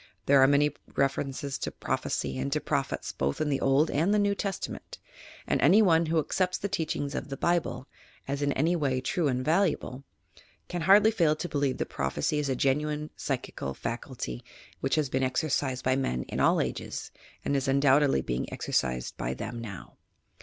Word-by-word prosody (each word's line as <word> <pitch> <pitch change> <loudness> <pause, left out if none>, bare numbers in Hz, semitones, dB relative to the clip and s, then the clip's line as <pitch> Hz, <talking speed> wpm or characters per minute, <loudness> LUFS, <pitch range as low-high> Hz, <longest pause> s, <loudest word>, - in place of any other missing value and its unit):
There 140 -1 +6
are 135 - +7
many 145 +1 +4 0.2
references 135 0 -1
to - - -2
prophecy 70 -1 -2
and 70 +1 -2
to - - +1
prophets - - -2
both 70 +1 -2
in 155 - 0
the 140 -1 0
Old 135 +4 +3
and 165 +7 +2
the 210 - +4
New 205 -1 +2
Testament, 200 -1 -5 0.5
and - - 0
any 195 +9 +6
one 165 -3 +4
who 165 +1 +1
accepts 180 +4 0
the 200 - -3
teachings 155 -7 -2
of - - -4
the 135 - -5
Bible, 170 -5 0 0.4
as 140 +1 -2
in 145 0 +1
any 165 +6 +2
way 135 -6 0
true 160 +4 0
and 130 -1 -1
valuable, 155 -5 +1 0.6
can 175 -1 -4
hardly 210 +3 +7
fail 165 -8 +2
to 165 - -4
believe 140 -4 0
that - - -3
prophecy 75 - -1
is 145 -2 -1
a 130 - +1
genuine 150 +3 0
psychical 70 0 -4
faculty - - -5 0.4
which 135 - 0
has 155 -2 +1
been 130 0 -1
exercised 130 -1 0
by 130 0 +3
men 65 - -1
in - - -5
all - - +4
ages - - -4 0.3
and 140 - +1
is 135 0 0
undoubtedly 140 - +4
being 60 +1 -2
exerci 65 -1 -1
sed - - -6
by - - -2
them 120 - -5
now. 105 -6 -9
140 Hz, 190 wpm, -28 LUFS, 130-160 Hz, 0.6 s, are